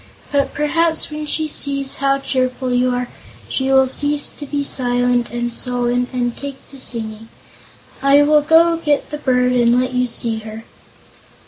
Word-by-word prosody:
But 280 -1 0
perhaps, 320 +2 0
when 300 0 -5
she 310 +1 0
sees 275 -2 0
how 275 0 +1
cheerful 255 -1 -2
you 250 +1 +2
are, 245 0 -2 0.4
she 265 0 -2
will 265 0 +5
cease 290 +2 +1
to 290 - -9
be 285 0 -2
silent 245 -2 0
and 240 0 -3
sullen 245 0 0
and 245 -2 -2
take 280 -1 -9
to 275 - -10
singing. 225 -3 -2 0.7
I 280 +1 +5
will 300 +1 +4
go 330 +2 +4
get 295 -4 -1
the 300 - -5
bird 250 -3 +1
and 240 0 +3
let 255 0 -2
you 250 0 +1
see 230 -1 -1
her." 220 +1 -9
260 Hz, 165 wpm, -18 LUFS, 245-290 Hz, 0.7 s, will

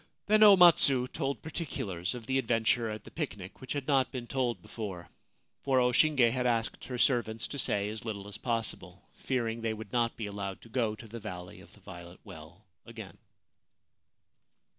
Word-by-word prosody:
Then 215 +1 +4
O 205 -2 +9
Matsu 145 -8 +6
told 140 0 -3
particulars 100 - -4
of 120 -2 -8
the 135 +2 +1
adventure 115 -1 +1
at 110 0 -6
the - - -13
picnic 105 - -6
which 130 - -4
had 145 -2 -4
not 135 -3 +2
been 125 -3 -5
told 120 -4 -1
before, 95 -2 -7 0.3
— - - -44
for 135 -2 +3
O 125 0 +3
Shinge 130 -3 +4
had 125 0 0
asked 115 -2 -1
her 125 -1 -5
servants 120 -3 +1
to 140 - -5
say 100 -4 0
as 110 +1 -5
little 105 -3 -5
as 105 - -7
possible, 115 -3 -2
fear 125 -3 -2
ing 115 +1 -4
they 115 -1 -1
would 110 0 -10
not 120 -1 +1
be 110 - -4
allowed 100 -1 -5
to 115 - -15
go 110 -2 0
to 115 +1 -12
the 115 +2 -8
Valley 90 -4 -8
of - - -17
the - - -18
Violet 85 +1 -11
Well 80 +6 -13 0.2
again. - - -10
115 Hz, 195 wpm, -30 LUFS, 105-130 Hz, 0.3 s, O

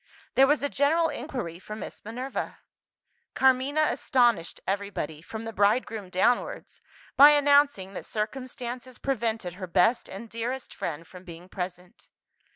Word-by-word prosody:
There 270 +1 +6
was 295 0 +2
a - - +2
general 315 +4 +2
inquiry 235 - -5
for 210 +3 -8
Miss 215 - -8
Minerva. 250 +5 -5 0.8
Carmina 265 +4 +3
astonished 235 -10 +1
everybody, 195 -6 -3
from 220 +6 -7
the 225 0 -6
bride 205 +5 +3
groom 210 -4 -7
downwards, 215 +7 0 0.3
by 285 +2 +10
announcing 285 -9 +4
that - - -7
circumstances 245 +2 -5
prevented 225 -8 -2
her 185 - -4
best 220 +7 +2
and 200 +5 -8
dearest 240 +3 -4
friend 165 0 -5
from 180 +2 -13
being 175 -1 -11
present. 180 -1 -7
225 Hz, 140 wpm, -27 LUFS, 185-265 Hz, 0.8 s, by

